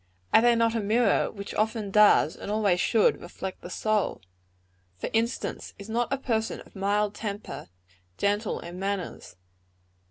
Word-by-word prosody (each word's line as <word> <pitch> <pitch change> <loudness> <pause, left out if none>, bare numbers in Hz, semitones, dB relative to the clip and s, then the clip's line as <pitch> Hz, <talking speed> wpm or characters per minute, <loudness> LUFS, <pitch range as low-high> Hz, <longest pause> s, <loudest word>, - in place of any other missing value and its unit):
Are - - +8
they 240 0 +5
not 230 -1 +2
a 230 - 0
mirror 220 +1 +2
which 200 -1 -8
often 215 -1 -1
does, 210 -7 +5
and - - -8
always 205 -4 +2
should, 225 -3 +3
reflect 185 +2 -7
the 175 - -8
soul? 215 +1 0 0.8
For - - -4
instance, 230 +2 -2
is 200 +2 -10
not 235 +2 0
a 275 - +1
person 225 -4 -1
of - - -17
mild 205 +1 +1
temper, 205 - -6 0.5
gentle 205 +1 0
in 175 +2 -8
manners? 195 - -4
210 Hz, 155 wpm, -27 LUFS, 200-225 Hz, 0.8 s, Are